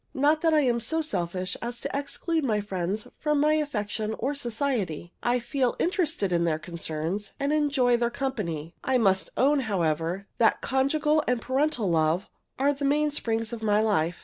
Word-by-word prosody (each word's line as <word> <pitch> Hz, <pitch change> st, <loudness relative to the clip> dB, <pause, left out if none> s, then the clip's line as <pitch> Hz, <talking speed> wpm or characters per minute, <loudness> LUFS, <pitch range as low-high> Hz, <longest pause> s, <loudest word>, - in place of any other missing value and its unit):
Not 295 Hz, +3 st, +3 dB
that 330 Hz, -, +3 dB
I 310 Hz, -1 st, +4 dB
am 245 Hz, -4 st, +2 dB
so 320 Hz, +8 st, -1 dB
selfish 185 Hz, -, -2 dB
as 240 Hz, 0 st, -4 dB
to -, -, -3 dB
exclude 310 Hz, +3 st, -1 dB
my 220 Hz, -5 st, +1 dB
friends 195 Hz, 0 st, -3 dB
from 300 Hz, -1 st, +1 dB
my 300 Hz, +1 st, +4 dB
affection 220 Hz, -7 st, -1 dB
or 270 Hz, +5 st, -1 dB
society. 230 Hz, -, -2 dB
I 240 Hz, +1 st, +2 dB
feel 255 Hz, +1 st, 0 dB
interested 330 Hz, -, 0 dB
in 170 Hz, 0 st, +2 dB
their 165 Hz, -2 st, +1 dB
concerns, 165 Hz, +4 st, -4 dB
and 280 Hz, +2 st, 0 dB
enjoy 275 Hz, -5 st, +3 dB
their 235 Hz, 0 st, +1 dB
company. 170 Hz, -, -3 dB
I 260 Hz, -1 st, +2 dB
must 190 Hz, -5 st, +2 dB
own, 285 Hz, +3 st, +4 dB
however, 175 Hz, -, -1 dB
that 225 Hz, -, +4 dB
conjugal 300 Hz, +3 st, +2 dB
and 250 Hz, -1 st, +2 dB
parental 260 Hz, -3 st, 0 dB
love 165 Hz, +1 st, +1 dB, 0.3 s
are 280 Hz, +2 st, +3 dB
the 280 Hz, 0 st, -6 dB
mainsprings 275 Hz, -6 st, 0 dB
of 230 Hz, -, -5 dB
my 210 Hz, -1 st, +3 dB
life. 180 Hz, -6 st, +1 dB
235 Hz, 175 wpm, -27 LUFS, 190-285 Hz, 0.3 s, I